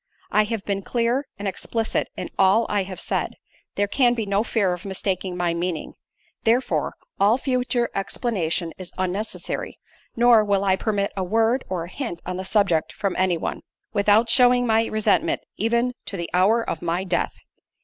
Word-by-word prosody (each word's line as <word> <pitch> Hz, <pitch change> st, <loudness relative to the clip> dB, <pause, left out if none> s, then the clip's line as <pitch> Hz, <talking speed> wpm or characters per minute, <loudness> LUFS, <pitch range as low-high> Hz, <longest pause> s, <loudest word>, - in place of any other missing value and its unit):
I 210 Hz, 0 st, +4 dB
have 220 Hz, -2 st, -4 dB
been 200 Hz, -1 st, -1 dB
clear 240 Hz, +6 st, 0 dB
and 200 Hz, 0 st, -4 dB
explicit 225 Hz, +3 st, -1 dB
in -, -, -5 dB
all 195 Hz, +4 st, +5 dB
I 205 Hz, -1 st, +1 dB
have 185 Hz, -1 st, -6 dB
said; -, -, -2 dB, 0.4 s
there 205 Hz, -, +1 dB
can 245 Hz, +2 st, +3 dB
be 225 Hz, -2 st, -2 dB
no 200 Hz, +1 st, +1 dB
fear 200 Hz, -6 st, +1 dB
of 180 Hz, +1 st, -7 dB
mistaking 190 Hz, -2 st, -2 dB
my 175 Hz, -1 st, +1 dB
meaning; 170 Hz, -1 st, -3 dB, 0.5 s
therefore, 240 Hz, +3 st, +1 dB, 0.2 s
all 205 Hz, +4 st, +5 dB
future 250 Hz, -2 st, 0 dB
explanation 185 Hz, -5 st, -1 dB
is 185 Hz, -2 st, -7 dB
unnecessary—nor 215 Hz, +4 st, 0 dB
will 200 Hz, -1 st, +1 dB
I 190 Hz, -1 st, +3 dB
permit 200 Hz, 0 st, -1 dB
a 190 Hz, -, -1 dB
word, 225 Hz, +6 st, +2 dB
or 180 Hz, -3 st, -2 dB
a -, -, -7 dB
hint 230 Hz, -10 st, -4 dB
on 180 Hz, 0 st, -3 dB
the 190 Hz, -, -5 dB
subject 190 Hz, -6 st, +2 dB
from 200 Hz, -3 st, -2 dB
any 185 Hz, -2 st, +2 dB
one, -, -, -4 dB, 0.3 s
without 210 Hz, +2 st, +4 dB
shewing 245 Hz, +1 st, +5 dB
my 225 Hz, -1 st, +3 dB
resentment 215 Hz, -1 st, +1 dB, 0.2 s
even 235 Hz, +3 st, +1 dB
to 195 Hz, -, -5 dB
the 170 Hz, -1 st, -5 dB
hour 210 Hz, +6 st, +3 dB
of 160 Hz, -, -3 dB
my 175 Hz, +2 st, -1 dB
death." 180 Hz, -2 st, -1 dB
205 Hz, 170 wpm, -23 LUFS, 185-230 Hz, 0.5 s, all